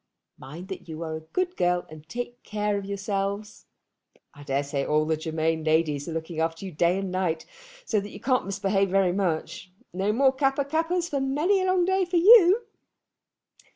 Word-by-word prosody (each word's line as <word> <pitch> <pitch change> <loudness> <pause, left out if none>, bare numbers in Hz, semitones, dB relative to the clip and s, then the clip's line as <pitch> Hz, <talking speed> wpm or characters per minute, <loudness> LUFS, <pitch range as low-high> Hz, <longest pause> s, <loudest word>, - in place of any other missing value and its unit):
Mind 160 +8 -9
that 190 -3 -8
you 160 +1 -5
are 160 -1 -4
a - - -4
good 365 0 -1
girl 175 0 +1
and 155 0 -13
take 245 +2 -6
care 210 -1 -2
of 200 -1 -3
yourselves. 200 +1 -3 0.7
I 145 - -14
daresay 140 0 -2
all 150 +1 +1
the 160 0 +1
Germain 160 0 -1
ladies 155 -2 +1
are - - -4
looking 160 0 -5
after 165 +3 -2
you 190 - -6
day 170 +3 +2
and 195 -1 -3
night, 180 -3 -1 0.4
so 215 - +1
that 200 +1 -6
you - - -10
can't 255 -4 0
misbehave 195 0 0
very 190 -1 +2
much. 185 0 -2 0.2
No 195 +3 0
more 265 +4 +3
Kappa 270 +1 +1
kappas 330 +4 0
for 280 -4 -2
many 305 +9 +1
a 375 - 0
long 370 -1 +3
day 380 +1 +2
for 350 0 0
you! 405 +3 +7
195 Hz, 190 wpm, -26 LUFS, 160-270 Hz, 0.7 s, you